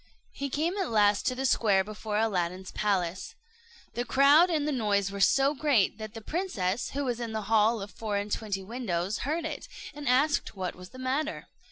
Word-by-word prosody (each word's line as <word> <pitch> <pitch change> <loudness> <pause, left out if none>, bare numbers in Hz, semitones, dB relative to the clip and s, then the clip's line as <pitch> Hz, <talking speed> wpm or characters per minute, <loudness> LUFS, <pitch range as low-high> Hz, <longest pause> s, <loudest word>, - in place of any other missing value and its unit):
He 280 0 -4
came 325 +8 -1
at 380 - -1
last 210 -2 +3
to 255 - +1
the 265 +1 -2
square 205 -6 +3
before 215 +1 -4
Aladdin's 185 -4 -1
palace. 190 -3 -1 0.6
The 240 - -2
crowd 280 +8 +5
and 305 -3 0
the - - +1
noise 205 -6 0
were 200 - -6
so 275 +8 +4
great 265 -9 +2
that 215 +1 -7
the 225 - -7
princess, 225 - -2
who 285 0 -2
was 245 -2 -2
in 230 -2 -4
the 220 -1 -2
hall 220 0 +3
of 200 - -9
four 210 +1 -3
and 205 +1 -3
twenty 200 -3 -2
windows, 200 -3 -2
heard 315 +4 -2
it, 310 -2 -5 0.3
and 290 -2 -4
asked 280 +1 +2
what 185 -2 -3
was 180 0 -12
the 255 - -13
matter. 270 +5 -2
225 Hz, 200 wpm, -28 LUFS, 200-280 Hz, 0.6 s, crowd